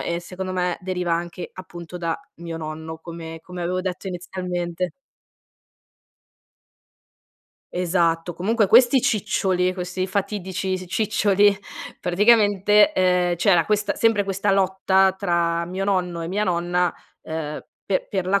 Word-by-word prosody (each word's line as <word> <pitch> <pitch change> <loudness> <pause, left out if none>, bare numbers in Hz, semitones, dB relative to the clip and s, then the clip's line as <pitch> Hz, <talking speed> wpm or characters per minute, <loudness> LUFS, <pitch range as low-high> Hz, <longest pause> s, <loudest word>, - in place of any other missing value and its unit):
e 170 - -2
secondo 185 +2 -6
me 180 -1 0
deriva 180 -2 -2
anche, 175 +1 -5
appunto, 175 -1 -9
da 170 -2 -2 0.2
mio 170 -1 -6
nonno, 160 0 -6
come 165 -1 -8
come 180 +2 -7
avevo 180 +2 -1
detto 185 +1 -4
inizialmente. 180 -1 -4 2.8
Esatto, 170 -1 0
comunque 215 +3 +1
questi 245 +5 +6
ciccioli, 190 -4 +1
questi 185 0 -3
fatidici 190 -1 -2
s 185 - -7
ciccioli, 205 0 +3 0.4
praticamente, 210 - +4
ehm, 180 -1 +2
c'era 175 -2 +4
questa 210 +1 0
sempre 225 -3 +2
questa 195 +1 0
lotta 190 0 +3
tra 170 -3 +1
mio 185 +3 -3
nonno 180 -4 0
e 165 - -4
mia 205 +4 0
nonna, 175 -1 +1 0.3
ehm, 160 -1 -5 0.3
pe 195 - 0
per 190 -3 -1
la 200 +1 +2
180 Hz, 125 wpm, -23 LUFS, 175-195 Hz, 2.8 s, questi